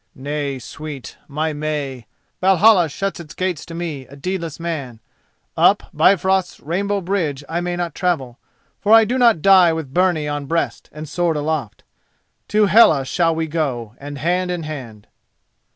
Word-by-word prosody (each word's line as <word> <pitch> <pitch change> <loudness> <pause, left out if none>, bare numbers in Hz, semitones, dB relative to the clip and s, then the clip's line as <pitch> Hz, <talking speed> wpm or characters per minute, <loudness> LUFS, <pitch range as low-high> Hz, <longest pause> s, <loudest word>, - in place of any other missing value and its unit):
"Nay, 140 0 -3
sweet, 145 +2 -8
my 155 +2 -2
May, 145 -5 -4 0.3
Valhalla 190 -1 +5
shuts 195 +6 -3
its 170 -1 -10
gates 185 -4 -3
to 165 - -8
me, 160 -6 -5
a 140 - -13
deedless 170 +1 -4
man; 145 -9 -5 0.6
up - - +4
Bifrost's 190 -1 +2
rainbow 200 +6 -2
bridge 170 -7 -2
I 170 +2 -2
may 175 0 -2
not 175 -3 -3
travel, 140 -10 -2 0.4
for 210 - +3
I 225 0 +8
do 250 +4 -1
not 230 -10 +4
die 190 -3 +7
with 155 -5 -5
byrnie 175 -4 +2
on 145 -1 -3
breast 165 +2 -2
and 155 +1 -8
sword 165 +1 0
aloft. 150 -7 -3 0.6
To 210 0 +3
Hela 185 -9 +5
shall 165 +3 +1
we 160 0 -1
go, 135 -9 -3
and 145 +1 -7
hand 180 +5 0
in 175 -2 -3
hand." 125 -9 -8
160 Hz, 160 wpm, -20 LUFS, 145-180 Hz, 0.6 s, I